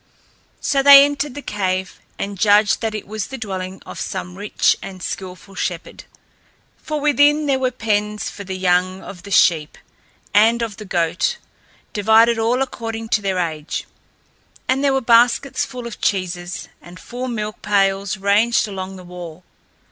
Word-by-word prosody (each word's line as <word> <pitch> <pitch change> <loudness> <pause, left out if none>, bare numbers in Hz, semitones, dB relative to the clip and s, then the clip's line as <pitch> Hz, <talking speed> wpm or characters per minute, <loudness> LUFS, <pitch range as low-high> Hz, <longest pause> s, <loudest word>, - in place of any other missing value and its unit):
So 275 -1 +1
they 280 0 +10
entered 285 -1 -3
the 290 - -7
cave 190 -2 -2 0.2
and 200 0 -4
judged 210 0 +4
that 220 -2 -2
it 215 - -5
was 215 +1 -4
the 265 - -7
dwelling 190 -4 -6
of - - -9
some 180 -1 -5
rich 205 +2 +1
and 190 -2 -9
skilful 190 +2 -7
shepherd. 180 -2 -5 0.7
For 305 -1 -4
within 295 +1 +3
there 275 -2 +1
were 260 -1 +1
pens 210 -3 -1
for 200 - -7
the 190 -1 -5
young 185 0 +1
of 185 -3 -10
the 200 - -11
sheep 160 -5 +3 0.6
and 230 +3 +4
of 215 -3 -5
the 215 - -9
goats, 170 -2 0 0.6
divided 225 +2 +4
all 240 +4 +2
according 225 -3 -6
to 210 - +2
their 195 -2 -1
age, 160 -3 -3 0.8
and 265 +2 +1
there 280 - +3
were 270 - +1
baskets 240 +3 +3
full 250 -2 -8
of 235 -2 -8
cheeses, 180 -2 -2
and 175 +1 -13
full 250 +5 -6
milk 215 -3 -4
pails 195 -1 +1
ranged 210 +4 +2
along 190 -1 -6
the 185 - -11
wall. 175 -1 -10
205 Hz, 165 wpm, -20 LUFS, 185-235 Hz, 0.8 s, they